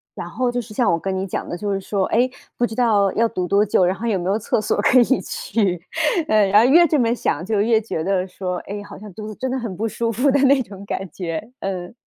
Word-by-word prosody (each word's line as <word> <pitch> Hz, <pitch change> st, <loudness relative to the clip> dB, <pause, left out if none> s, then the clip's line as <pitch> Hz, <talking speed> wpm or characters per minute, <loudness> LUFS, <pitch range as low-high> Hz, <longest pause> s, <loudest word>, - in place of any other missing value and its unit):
然 -, -, -6 dB
后 250 Hz, -1 st, -1 dB
就 245 Hz, -, -2 dB
是 215 Hz, -2 st, -8 dB
像 240 Hz, -3 st, +2 dB
我 170 Hz, -, +1 dB
跟 190 Hz, +1 st, -3 dB
你 190 Hz, -, -2 dB
讲 -, -, -4 dB
的， -, -, -4 dB
就 205 Hz, +3 st, -3 dB
是 195 Hz, -, -1 dB
说， 195 Hz, 0 st, -1 dB
诶， 245 Hz, +3 st, +2 dB, 0.3 s
不 240 Hz, -, +1 dB
知 220 Hz, -, -8 dB
道 215 Hz, -5 st, +3 dB
要 230 Hz, -, +2 dB
堵 180 Hz, -1 st, -3 dB
多 200 Hz, +3 st, +3 dB
久， 190 Hz, -3 st, +3 dB
然 185 Hz, +2 st, +1 dB
后 220 Hz, -, -6 dB
有 215 Hz, -5 st, +1 dB
没 180 Hz, +2 st, -2 dB
有 205 Hz, -, +2 dB
厕 215 Hz, -, 0 dB
所 210 Hz, -, 0 dB
可 255 Hz, +4 st, +5 dB
以 -, -, +7 dB, 0.2 s
去。 195 Hz, -5 st, -1 dB, 0.5 s
嗯， 210 Hz, -2 st, +3 dB
然 210 Hz, +4 st, +6 dB
后 -, -, +3 dB
越 340 Hz, +5 st, +7 dB
这 305 Hz, -, +2 dB
么 230 Hz, -1 st, +2 dB
想 170 Hz, -6 st, -2 dB
就 210 Hz, -1 st, +1 dB
越 220 Hz, +1 st, +3 dB
觉 185 Hz, -7 st, -4 dB
得 190 Hz, 0 st, 0 dB
说， 180 Hz, -1 st, -4 dB
诶， 205 Hz, +1 st, -7 dB
好 -, -, -11 dB
像 210 Hz, -1 st, -11 dB
肚 215 Hz, +3 st, -8 dB
子 215 Hz, -, -7 dB
真 260 Hz, -, -3 dB
的 260 Hz, -, -1 dB
很 230 Hz, -6 st, -5 dB
不 225 Hz, +3 st, -1 dB
舒 230 Hz, +1 st, -2 dB
服 250 Hz, +6 st, +1 dB
的 280 Hz, -, +3 dB
那 275 Hz, 0 st, +5 dB
种 195 Hz, -2 st, -11 dB
感 190 Hz, -2 st, -4 dB
觉， 180 Hz, +7 st, -5 dB
嗯。 185 Hz, 0 st, -4 dB
210 Hz, 300 characters per minute, -21 LUFS, 190-235 Hz, 0.5 s, 以